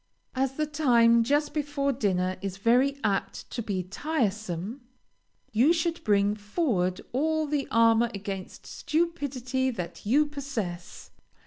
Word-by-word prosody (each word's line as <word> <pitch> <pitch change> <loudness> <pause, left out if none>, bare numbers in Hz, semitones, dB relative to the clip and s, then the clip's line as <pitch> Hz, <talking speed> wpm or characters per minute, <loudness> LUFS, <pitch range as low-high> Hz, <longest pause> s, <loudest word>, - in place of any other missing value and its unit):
As 265 0 0
the 305 +3 -1
time 240 -6 +4
just 290 +4 +1
before 290 -2 -1
dinner 185 -6 0
is 195 -1 -4
very 250 +7 +3
apt 200 -2 -1
to 240 - -3
be 195 -4 -2
tiresome, 215 - -2 0.7
you 245 +9 +4
should 335 0 -1
bring 205 -1 +3
forward 205 - -1
all 315 +4 +1
the 290 -2 -1
armor 230 +1 +4
against 195 -2 -6
stupidity 275 -6 -1
that 180 -9 -6
you 275 +9 +3
possess. 245 -12 -6
240 Hz, 125 wpm, -27 LUFS, 205-290 Hz, 0.7 s, time